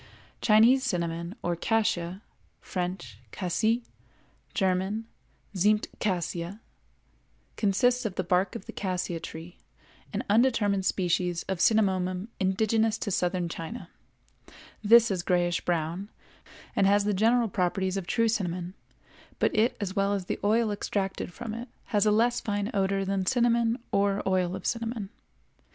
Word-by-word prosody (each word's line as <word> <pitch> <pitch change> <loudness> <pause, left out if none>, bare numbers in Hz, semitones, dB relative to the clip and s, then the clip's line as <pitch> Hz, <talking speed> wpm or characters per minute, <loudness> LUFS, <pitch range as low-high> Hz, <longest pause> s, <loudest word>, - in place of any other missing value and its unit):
Chinese 235 +5 +5
cinnamon 170 -4 -2
or 175 0 0
cassia 190 -1 0 0.4
(French, 180 -1 -5
Cassie; 220 +6 0 0.7
German, 190 +3 0 0.5
Zimmtcassia) 185 -2 0 1.0
consists 245 +5 +2
of 210 -5 -3
the 185 - -1
bark 180 +1 +1
of - - -7
the - - -7
cassia 180 -3 -3
tree, 165 +2 -9 0.5
an - - -2
undetermined 205 -4 +2
species 180 -2 0
of 190 -3 -3
Cinnamomum 190 -2 +2
indigenous 220 +3 +1
to 205 - -3
Southern 180 -1 0
China; 165 +8 -7 0.9
this 230 +1 +6
is 185 -2 0
grayish 175 -1 +1
brown 175 +3 -2 0.7
and 195 - +4
has 200 +1 +4
the 205 0 +1
general 230 +4 +3
properties 190 0 -1
of 195 -3 -4
true 230 +2 +2
cinnamon, 180 -5 -2 0.6
but - - +1
it 220 +3 +2
as 195 -2 -3
well 200 0 +2
as 195 -2 -2
the - - -3
oil 220 +1 +2
extracted 195 -2 -3
from 225 +3 -6
it 235 +2 -6 0.2
has 205 0 +3
a - - +5
less 235 +3 +2
fine 205 0 -2
odor 195 0 +1
than 190 -1 -1
cinnamon 235 -2 +2
or 200 0 +1
oil 185 -1 +1
of 190 - -8
cinnamon. 230 -3 -3
195 Hz, 135 wpm, -28 LUFS, 180-220 Hz, 1.0 s, this